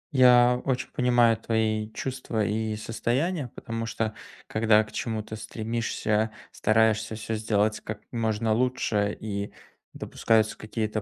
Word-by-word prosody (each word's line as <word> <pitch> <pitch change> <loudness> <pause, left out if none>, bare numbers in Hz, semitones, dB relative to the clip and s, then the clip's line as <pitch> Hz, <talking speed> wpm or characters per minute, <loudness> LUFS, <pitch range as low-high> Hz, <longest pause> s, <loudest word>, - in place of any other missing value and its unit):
Я 125 -1 +6
очень 130 -2 -1
понимаю 120 -2 +3
твои 110 -1 0
чувства 125 -5 -2
и 110 0 -1
состояния. 130 +8 -1
Потому, 115 -1 -4
что 110 -1 -2 0.3
когда 110 0 +3
к 105 - -13
чему-то 110 -1 -4
стремишься, 110 -1 -1 0.2
стараешься 110 0 +2
всё 110 +1 -4
сделать 110 -1 +1
как 105 -1 -6
можно 110 -2 0
лучше, 110 -4 0
и 100 -1 -4 0.4
допускаются 110 -1 +1
какие-то 110 0 -3
110 Hz, 120 wpm, -26 LUFS, 110-115 Hz, 0.4 s, Я